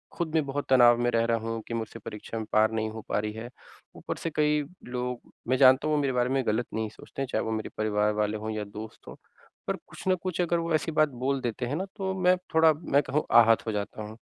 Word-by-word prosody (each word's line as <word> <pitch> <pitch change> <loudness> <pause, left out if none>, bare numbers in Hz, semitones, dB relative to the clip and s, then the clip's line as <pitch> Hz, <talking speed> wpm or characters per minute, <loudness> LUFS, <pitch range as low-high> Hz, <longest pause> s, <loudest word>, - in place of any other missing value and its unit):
खुद 170 -3 -2
भी 160 - +3
बहुत 145 0 -3
तनाव 120 -2 +7
में 120 - +2
रह 115 0 +2
रहा 115 0 +2
हूँ, 115 0 -4
कि 115 - -5
मुझसे 115 0 -4
परीक्षा 105 +2 -7
में 110 - -3
पार 110 +1 +4
नहीं 110 0 -1
हो 110 0 -7
पा - - +1
रही 105 0 -3
है। 115 +2 -7 0.5
ऊपर - - -5
से 165 - -3
कई 150 0 +2 0.3
लोग 125 0 -3 0.3
मैं 130 +2 +2
जानता 130 +2 +6
हूँ, 155 - +2
वो 145 - +2
मेरे 135 -2 0
बारे 125 0 +1
में 135 0 +1
गलत 110 +3 +1
नहीं 110 -1 -2
सोचते 135 - -9
हैं, 135 - -1
चाहे 110 - +1
वो 110 - -3
मेरे 110 -1 -3
परिवार 105 0 +1
वाले 105 0 0
हों 110 +1 -4
या 110 -1 -3
दोस्त 105 +2 -10
हों, - - -8 0.5
पर - - 0
कुछ - - -10
ना 185 - +4
कुछ 180 0 -3
अगर 175 -1 +1
वो 165 -1 -2
ऐसी 155 +1 -1
बात 155 -1 +3
बोल 130 +2 -2
देते 120 0 -2
हैं 130 - -2
ना, 185 +5 -2
तो 190 -1 -2
मैं 180 0 +5 0.2
थोड़ा, 160 -1 +6
मैं 145 -2 +1
कहूँ, 150 +3 0
आहत 115 -1 +6
हो - - 0
जाता 105 +1 -4
हूँ। 105 - -8
120 Hz, 265 wpm, -27 LUFS, 110-150 Hz, 0.5 s, तनाव